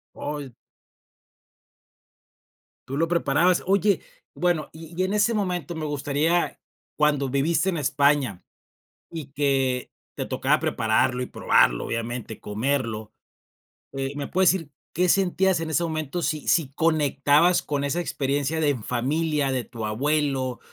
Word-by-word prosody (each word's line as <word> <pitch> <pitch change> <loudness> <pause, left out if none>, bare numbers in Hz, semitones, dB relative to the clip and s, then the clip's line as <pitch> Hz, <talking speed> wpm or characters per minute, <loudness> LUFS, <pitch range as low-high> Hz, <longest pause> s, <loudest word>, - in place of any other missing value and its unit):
Oh. 145 -3 -5 2.4
¿Tú 135 - -3
lo 165 +2 +2
preparabas? 170 +1 +2
Oye, 200 +1 +2 0.3
bueno, 175 -3 0
y 165 +2 -11
y 185 - +3
en 190 - -2
ese 210 +2 +3
momento 180 -6 -2
me 160 -1 -4
gustaría 150 +4 0 0.4
cuando 145 -3 +2
viviste 155 +6 +1
en 170 - -1
España, 140 -7 +1 0.7
y 160 -4 -6
que 135 -3 0 0.2
te - - -4
tocaba - - +1
prepararlo 125 0 +1
y - - -3
probarlo, - - +2
obviamente, 115 -1 -4
comerlo, 110 -1 -2 0.8
eh, 135 0 -3
¿me 145 -1 -4
puedes 185 0 +4
decir 170 -6 -3 0.2
qué 180 0 +2
sentías 190 -1 +2
en 165 - -3
ese 165 +2 +1
momento, 155 0 -3
si 155 -3 -2
si 160 -6 +3
conectabas 155 +2 +3
con 145 -1 -2
esa 145 +5 -1
experiencia 145 0 -1
de 150 - +2
en 125 -7 -2
familia, 145 +4 0
de 130 -2 -1
tu 115 -3 -6
abuelo, 135 +2 0
145 Hz, 135 wpm, -25 LUFS, 135-170 Hz, 2.4 s, puedes